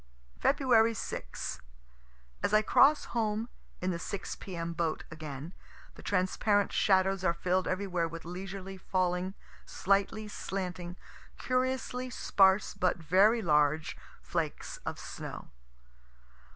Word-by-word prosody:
Feb. 235 -5 +4
6. - - -5 0.8
As 205 - 0
I 215 - +5
cross 295 +7 +5
home 220 0 -1 0.3
in 185 +1 0
the 170 - -3
6 195 +3 -4
P. 190 - -8
M. 170 0 -3
boat 165 -1 -1
again, 155 +1 -7 0.4
the - - -13
transparent 200 +2 +1
shadows 190 -1 +3
are 170 -2 +2
filled 180 +2 0
everywhere 185 -3 0
with 165 0 -8
leisurely 190 +2 -6
falling, 185 0 -1 0.3
slightly 200 +2 0
slanting, 180 -3 -4 0.4
curiously 255 0 -1
sparse 195 -4 +3
but 180 - +1
very 195 +8 +4
large, 155 -1 +2 0.3
flakes - - -3
of - - -2
snow. - - -7
190 Hz, 115 wpm, -31 LUFS, 175-210 Hz, 0.8 s, I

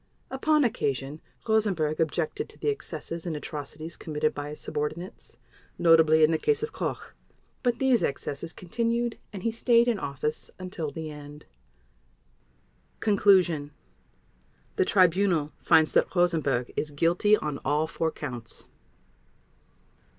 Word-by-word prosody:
Upon 300 +3 +2
occasion 140 - -2 0.3
Rosenberg 195 -9 +1
objected 160 0 -1
to - - -15
the - - -1
excesses 170 - -5
and 160 -3 -2
atrocities 150 +2 -7
committed 155 -1 -1
by 145 0 -5
his 150 - -8
subordinates, 155 -1 -5 0.4
notably 160 -2 +5
in 155 - +5
the 160 - +1
case 445 0 +1
of 450 - -3
Koch, - - -4 0.5
but 245 -2 +1
these 260 -3 +3
excesses 140 +3 -3
continued 230 +6 -2
and 195 -3 -8
he 230 - +1
stayed 235 +1 +3
in 230 -4 +1
office 140 +2 -3
until 180 -4 -4
the 155 +2 -6
end. 150 0 -11 1.5
Conclusion. 185 -8 +3 1.0
The 385 - +2
Tribunal 185 - +3
finds 160 -2 +4
that - - +2
Rosenberg 155 -8 +1
is 155 - -2
guilty 170 +8 +3
on 150 -5 -4
all 150 +2 +1
four 160 0 -1
Counts. 125 -8 -6
165 Hz, 130 wpm, -27 LUFS, 150-210 Hz, 1.5 s, notably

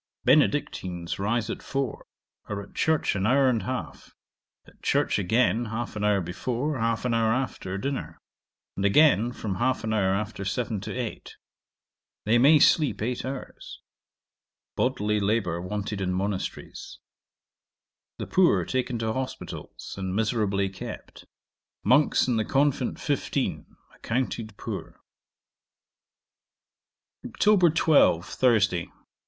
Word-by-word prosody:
Benedictines 90 -2 +1
rise 110 +2 0
at - - -6
four; 135 -4 -3 0.4
are 100 -1 -3
at 100 - -16
church 160 -7 +1
an 95 +1 0
hour 135 +3 +4
and 120 -4 +2
half; 130 +6 -6 0.5
at - - -21
church - - +1
again 110 +3 +2
half 115 +1 -4
an 105 - -3
hour 105 -2 +3
before, 125 - -3
half 115 +1 0
an 125 - +1
hour 115 -1 +2
after, 115 -6 -2
dinner; 135 +6 -4 0.6
and 95 - -3
again 120 +1 +4
from 105 -6 -4
half 130 +2 0
an 110 0 -1
hour 95 -3 +2
after 105 -1 -4
seven 105 0 -2
to - - -6
eight. 125 -3 -5 0.9
They 115 +3 +4
may 145 +5 +7
sleep 150 0 +3
eight 120 +3 -2
hours. 130 0 -7 1.0
Bodily 105 -5 0
labour 100 -5 0
wanted 105 +2 -4
in 90 -1 -1
monasteries. 95 +1 -4 1.2
'The - - -4
poor 185 -2 +3
taken 125 -1 -1
to 110 -1 -1
hospitals, 130 +1 -6
and 95 -1 -3
miserably 105 -3 +1
kept. 95 - -9 0.6
Monks 145 -2 +4
in 120 -3 +1
the 110 - +1
convent 140 0 +1
fifteen: - - -2 0.2
accounted 115 -3 -3
poor. - - -7 2.2
'Oct. 185 -6 +3
12. 145 - +4
Thursday. 100 -8 +1
110 Hz, 125 wpm, -26 LUFS, 100-130 Hz, 2.2 s, may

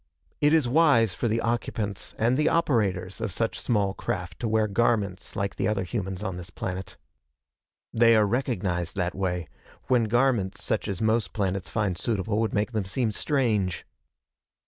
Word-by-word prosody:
It 150 - +4
is 155 -5 +4
wise 120 - +4
for 120 - -1
the 115 +1 0
occupants 110 -4 -2
and 115 +3 +2
the 150 +3 +3
operators 105 - 0
of 110 -3 -2
such 115 +5 -1
small 100 -5 +1
craft 90 -2 -4
to 120 - -2
wear 110 0 +2
garments 100 -3 0
like 100 -1 -2
the - - 0
other 105 -3 0
humans 95 0 -4
on 95 -4 -3
this 90 +1 -7
planet. 95 0 -5 1.0
They 115 0 +5
are 110 -1 +5
recognized, 95 -8 -1
that 90 -1 -1
way, 90 -4 -2 0.4
when 125 -3 +4
garments 120 -4 +1
such - - -1
as 100 +1 -3
most 110 -1 +1
planets 95 -3 -2
find 100 0 0
suitable 110 -2 -1
would 110 -1 0
make 105 +3 0
them 110 -3 -1
seem 110 +4 -1
strange. 110 - 0
105 Hz, 170 wpm, -26 LUFS, 95-115 Hz, 1.0 s, They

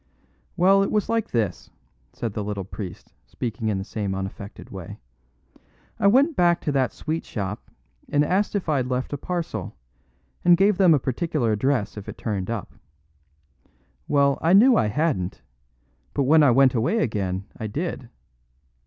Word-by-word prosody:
"Well, 195 +3 +5
it 195 - +1
was 210 -1 0
like 230 -1 0
this," 110 -7 -2 0.4
said 115 -4 -4
the 105 - -3
little 100 -1 -4
priest, 95 -2 -8
speaking 115 -2 -4
in 105 -3 0
the 95 - -3
same 100 -2 -3
unaffected 95 +1 -7
way. - - -8 1.0
"I 200 - +4
went 275 +9 +4
back 175 -1 +3
to 150 - -1
that 130 -5 +1
sweet 160 +1 -4
shop 100 -1 -5 0.4
and 145 +1 +2
asked 195 +6 0
if 200 - -2
I'd 140 -5 +1
left 130 +2 -2
a - - -1
parcel, 125 - -4 0.7
and 175 0 +6
gave 195 +1 +3
them 180 -5 +6
a - - +1
particular 130 -1 -1
address 110 -2 0
if 100 - -7
it - - -8
turned 100 -4 -3
up. 115 -4 -4 1.3
Well, 140 -1 +2
I 165 +3 +3
knew 235 +6 +7
I 110 - +2
hadn't; 120 - -1 0.7
but 140 - +2
when 155 +4 +5
I 145 - +6
went 130 +1 +5
away 125 - +1
again 100 - -1
I 110 - -4
did. 140 - -4
130 Hz, 165 wpm, -24 LUFS, 105-170 Hz, 1.3 s, knew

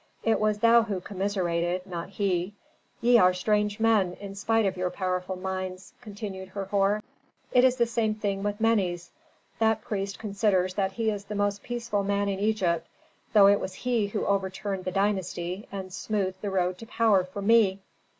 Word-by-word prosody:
It 225 - +2
was 215 -1 +1
thou 230 +2 +6
who 210 -4 -3
commiserated, 180 -2 -1
not 175 -3 -6
he. 195 -1 -1 0.5
Ye 240 0 +6
are 180 -1 +5
strange 210 +2 0
men, 215 -5 +3
in 200 +1 -8
spite 225 +3 +1
of 190 - 0
your 180 0 -1
powerful 185 0 -2
minds," 185 0 -5
continued 200 -4 -7
Herhor. 200 +1 0 0.5
"It 250 - +5
is 260 -1 +5
the 240 -2 +2
same 225 -2 0
thing 200 -2 -2
with 205 +1 -2
Menes. 190 -6 +1 0.5
That 220 -1 +2
priest 200 -1 -3
considers 200 -3 0
that 195 -1 -1
he 225 0 0
is 205 -1 -5
the 210 +1 -6
most 205 0 0
peaceful 235 -4 -2
man 200 0 0
in 195 -1 -2
Egypt, 190 -6 0 0.5
though 205 -3 +8
it 200 0 +5
was 185 - -5
he 240 -4 0
who 205 +1 -3
overturned 195 -1 -2
the 185 - -1
dynasty 190 -1 -1
and 190 -2 -6
smoothed 190 -2 -2
the 205 - -2
road 185 -1 0
to 225 - -10
power 220 -5 +3
for 185 +2 -7
me. 210 -3 +4
200 Hz, 180 wpm, -27 LUFS, 185-215 Hz, 0.5 s, though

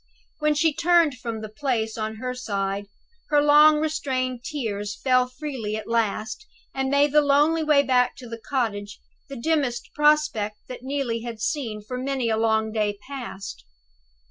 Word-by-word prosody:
When 300 0 +2
she 315 +1 +3
turned 330 -5 +3
from 230 -3 -5
the 215 - -5
place, 220 -1 -2
on 220 0 -3
her 250 +3 -4
side, 200 -4 -3 0.4
her 295 -1 +4
long 300 +1 +7
restrained 260 -5 -2
tears 210 -8 -4
fell 255 -1 +3
freely 255 -5 -5
at 220 - -6
last, 225 - -1 0.3
and 265 0 -1
made 285 +1 +3
the 300 +1 +5
lonely 295 +3 +3
way 300 -2 +4
back 250 -2 +2
to 250 - -11
the 230 0 -7
cottage 210 -7 -2 0.3
the 275 - -7
dimmest 260 -3 -1
prospect 295 -9 +2
that 250 - -8
Neelie 260 -4 -2
had 230 -1 -6
seen 225 -5 -2
for 250 +4 -5
many 260 -2 -1
a 220 - +1
long 220 -1 +1
day 210 -2 -1
past. 245 - -7
250 Hz, 165 wpm, -24 LUFS, 220-290 Hz, 0.4 s, long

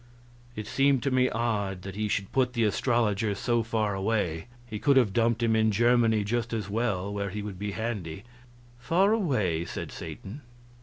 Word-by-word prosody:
It 105 - -5
seems 135 +2 +2
to 140 - 0
me 130 0 +3
odd 100 -5 -2
that 95 - -6
he 105 +1 -1
should 100 -1 -2
put 125 -2 +1
the 115 -2 +1
astrologer 110 -2 +1
so 120 +3 +1
far 110 -2 -1
away; 95 -4 -1 0.2
he 110 -3 -6
could 140 +2 +4
have 115 -7 +3
dumped 115 +1 +2
him 115 -1 +3
in 110 0 +3
Germany 115 0 +3
just 115 +2 -2
as 110 -3 -2
well, 100 -3 -1
where 100 -1 -2
he 105 +2 -5
would 100 -3 -7
be 100 0 -3
handy. 100 -6 -4 0.6
"Far 185 - +3
away?" 110 - +1
said - - -6
Satan. 110 +10 -8
110 Hz, 185 wpm, -28 LUFS, 100-120 Hz, 0.6 s, could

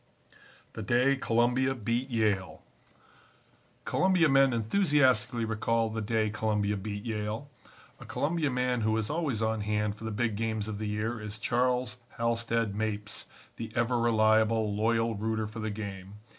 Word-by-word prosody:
THE 110 - -6
DAY 125 +6 +3
COLUMBIA 125 +2 +1
BEAT 120 +3 -2
YALE 100 -8 0 1.2
Columbia 185 -4 +3
men 135 -1 +5
enthusiastically 125 - +2
recall 115 +1 0
the 110 0 -3
day 110 0 0
Columbia 105 -1 0
beat 100 +1 -5
Yale. 110 +5 -4 0.5
A - - -10
Columbia 155 0 0
man 125 -1 0
who 110 0 +1
is 110 +2 -2
always 145 -9 -1
on 110 -1 0
hand 105 0 -1
for 110 - -12
the - - -2
big 110 0 -1
games 110 -1 -2
of 105 -1 -5
the 110 - -3
year 110 +2 -2
is 105 0 -7
Charles 125 +1 0 0.2
Halstead 115 -2 0
Mapes, 105 -1 -3 0.3
the 115 -1 -6
ever 120 +1 +1
reliable, 110 -1 +3
loyal 115 +1 +1
rooter 110 +1 -1
for 110 +2 -7
the 110 0 -2
game. 100 -2 -6
110 Hz, 150 wpm, -29 LUFS, 105-120 Hz, 1.2 s, men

